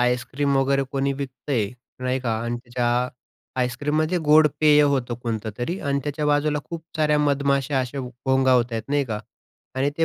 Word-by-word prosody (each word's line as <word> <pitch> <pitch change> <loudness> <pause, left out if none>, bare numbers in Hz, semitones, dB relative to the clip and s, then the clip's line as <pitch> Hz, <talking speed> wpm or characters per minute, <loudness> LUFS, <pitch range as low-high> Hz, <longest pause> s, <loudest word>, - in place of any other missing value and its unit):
Ice cream 130 +3 +1
वगैरे 135 +1 +2
कोणी 140 0 +1
विकतंय 130 -5 -2 0.3
नाही 130 +1 0
का 120 -3 -1
आणि 120 0 -2
त्याच्या 120 0 -2 0.7
आईस्क्रीम 125 +4 -1
म्हणजे 155 +3 +1
गोड 155 +1 +7
पेय 150 -1 +6
होतं 135 -4 +1
कोणतं 110 -2 -3
तरी 165 +10 -2
आणि 140 -1 0
त्याच्या 150 +1 -2
बाजूला 150 0 +2
खूप 165 -1 -7
साऱ्या 150 -1 +3
मधमाश्या 140 -1 +1
अशा 130 +2 -4
घोंगावतायेत 125 -2 +1
नाही 145 0 +1
का? 110 -4 -3 0.6
आणि 135 +2 +1
ते 165 - +4
135 Hz, 160 wpm, -23 LUFS, 125-145 Hz, 0.7 s, गोड